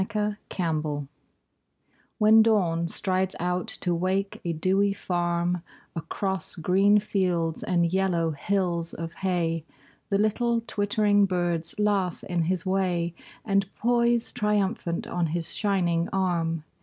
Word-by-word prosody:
Alarm 210 0 0
Clocks 155 -5 -2 1.1
When 220 0 +7
Dawn 180 -7 +2
strides 185 +1 -1
out 180 +1 -1
to 175 - +1
wake 190 +3 -1
a 170 - -1
dewy 190 +5 +2
farm 175 -1 -1 0.3
Across 190 +4 -3
green 195 +5 +4
fields 180 -6 0
and 170 -1 +1
yellow 175 -4 +1
hills 170 +1 -1
of 165 0 -5
hay 170 -4 -1 0.5
The 200 - +2
little 230 +3 +1
twittering 205 -2 +2
birds 175 -2 -1
laugh 200 -4 0
in 175 -2 -1
his 180 0 -1
way 180 -3 0 0.3
And 195 -2 +1
poise 235 0 +2
triumphant 205 -4 0
on 175 -1 -1
his 165 +1 -3
shining 175 -5 +1
arm. 170 -4 0
185 Hz, 120 wpm, -26 LUFS, 170-200 Hz, 1.1 s, When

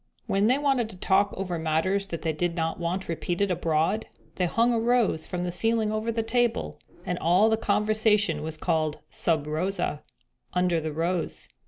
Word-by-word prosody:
When 200 +2 +2
they 255 +3 +4
wanted 270 -6 +1
to 205 - -11
talk 195 +2 +2
over 180 -3 -3
matters 165 +5 0
that 170 -4 -6
they 160 -1 0
did 170 +2 -1
not 165 0 -2
want 175 +3 -2
repeated 175 +3 -1
abroad 165 +4 0 0.3
they 180 - 0
hung 230 +6 +2
a 230 - +1
rose 230 -8 +1
from 180 -1 -3
the 180 - -2
ceiling 225 +3 +2
over 215 +1 -1
the 225 0 -1
table, 235 +1 0 0.3
and 180 0 -2
all 185 +7 +4
the - - +4
conversation 210 -5 +2
was 155 0 -4
called 155 -1 0
'sub 160 -4 +1
rosa,' 155 0 -2 0.5
'under 180 -2 +2
the 155 0 -3
rose.' 165 +3 -2
185 Hz, 180 wpm, -26 LUFS, 165-215 Hz, 0.5 s, they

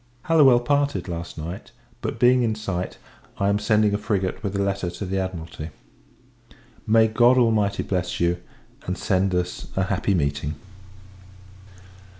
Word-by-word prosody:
Hallowell 140 -7 +5
parted 145 +1 0
last 85 -1 -6
night; 85 +4 -6 0.3
but, - - -3
being 125 +1 +5
in 110 -2 +1
sight, 95 -4 -4 0.4
I 100 - +1
am 100 0 +2
sending 105 -1 +2
a 105 - 0
frigate 100 -3 -1
with 100 -2 -3
a - - 0
letter 100 -2 -1
to 90 +3 -6
the 95 +1 -1
Admiralty. 85 -4 -5 1.2
May 110 +1 +5
God 120 +3 +4
Almighty 110 -5 +2
bless 90 -2 -2
you, 85 0 +2 0.5
and 90 - -2
send 95 -1 +1
us 90 0 -2
a 95 - +1
happy 95 0 0
meeting! 70 -1 -1
100 Hz, 150 wpm, -24 LUFS, 90-110 Hz, 1.2 s, Hallowell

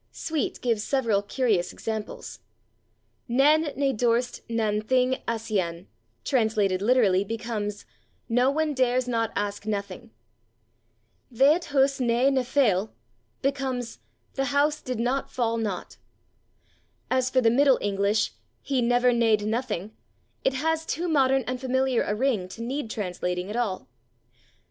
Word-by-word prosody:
Sweet 315 -2 -2
[Pg233] - - -14
gives 230 -4 0
several 230 -7 +1
curious 205 -4 0
examples. 220 -1 -6 0.9
"Nān 290 +4 +3
ne 275 -1 +1
dorste 240 +1 0
nān 215 -2 0
thing 255 +2 +1
āscian," 200 -7 -2 0.4
translated 215 -7 +1
literally, 205 -5 +3
becomes 210 -1 -4 0.4
"/no/ 245 +3 +3
one 310 +1 0
dares 255 -1 +1
/not/ 230 -2 -1
ask 205 0 -3
/nothing/." 200 -3 -4 1.2
"Thaet 285 +8 +4
hus 275 -1 +2
nā 250 +2 +2
ne 265 - +2
feoll" 220 -6 +2 0.5
becomes 265 - -2 0.3
"the 270 - -1
house 290 +2 +1
did 255 -2 -4
/not/ 250 +4 -1
fall 230 -2 -1
/not/." 205 -5 -4 1.1
As 255 0 +2
for 260 - +2
the 225 -2 +4
Middle 270 +1 +5
English 200 +1 +1 0.3
"he 270 -3 0
/never/ 245 +1 +3
nadde 225 -3 +3
/nothing/," 220 -3 -2 0.5
it 265 - +1
has 320 +3 0
too 340 +2 -3
modern 270 -4 +3
and 250 0 -4
familiar 260 -1 +1
a 210 - -1
ring 225 -6 0
to 230 - -7
need 260 0 -3
translating 180 -2 -3
at - - -5
all. 225 -6 -2
240 Hz, 135 wpm, -26 LUFS, 210-265 Hz, 1.2 s, Middle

